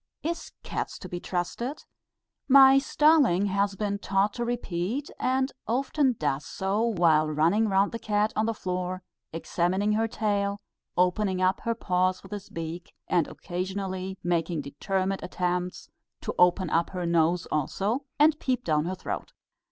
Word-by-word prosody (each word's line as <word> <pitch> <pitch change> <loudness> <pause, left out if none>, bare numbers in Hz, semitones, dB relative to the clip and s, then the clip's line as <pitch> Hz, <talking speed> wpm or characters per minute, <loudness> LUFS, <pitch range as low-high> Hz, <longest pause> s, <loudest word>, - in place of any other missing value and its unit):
"Is 335 +2 -3
cats - - -4
to 185 - -9
be 175 -1 -5
trusted?" 215 - -3 0.6
my 270 0 +8
starling 275 - +4
has 200 0 0
been 200 0 -2
taught 200 +1 +1
to 240 - -3
repeat, 235 +2 -2
and 260 +1 +1 0.2
often 265 +3 +1
does 145 - -1
so 195 +6 -2
while 170 -9 +3
running 170 +9 +2
round 195 +1 +3
the 230 - -5
cat 210 -1 0
on 215 +1 +1
the 230 - 0
floor, 185 -1 -3 0.3
examining 180 +5 0
her 220 +1 +2
tail, 205 -2 -1 0.4
opening 185 +1 +2
up 185 +1 +2
her 230 0 +1
paws 185 -3 0
with 195 - -13
his 205 -1 -6
beak, 165 +1 -6
and 170 -4 +2
occasionally 190 +1 -4
making 170 -2 0
determined 190 +7 -2
attempts 180 0 -2 0.3
to - - -3
open 180 -1 +4
up 165 0 +2
her 180 -2 -4
nose 170 +1 +2
also, 205 - -1
and 300 +1 +4
peep 255 -2 -1
down 155 -1 +1
her 185 +2 -2
throat. 185 - -5
195 Hz, 150 wpm, -27 LUFS, 175-225 Hz, 0.6 s, my